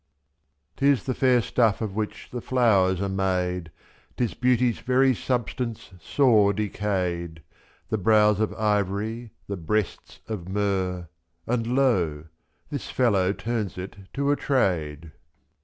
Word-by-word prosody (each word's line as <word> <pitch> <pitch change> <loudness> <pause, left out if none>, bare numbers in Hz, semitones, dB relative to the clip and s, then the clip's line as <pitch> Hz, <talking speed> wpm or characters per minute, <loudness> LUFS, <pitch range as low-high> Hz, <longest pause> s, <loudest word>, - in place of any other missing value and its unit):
'Tis 140 -2 +3
the 130 - -1
fair 125 -2 +3
stuff 115 -4 +2
of 110 -4 -3
which 105 -1 -4
the 125 - -4
flowers 100 -8 +3
are 100 - -1
made, 90 -3 -1 0.5
'Tis 120 -3 0
beauty's 125 -2 +2
very 130 +1 +3
substance 120 -2 -3
sore 105 -1 +3
decayed, 95 -5 -2
/^^. - - -16 0.5
The 110 - -1
brows 105 0 +4
of 110 - +1
ivory, 105 +2 -1 0.2
the 100 - -4
breasts 95 +4 -2
of 95 -5 -5
myrrh, 95 -3 -1 0.2
— 85 0 -46
And 115 -1 -1
lo! 90 - +2 0.5
this - - -4
fellow 100 -7 +2
turns 110 -2 -3
it 95 +1 -6 0.2
to 140 +1 +1
a - - +3
trade. 85 - -1
105 Hz, 135 wpm, -25 LUFS, 95-120 Hz, 0.5 s, brows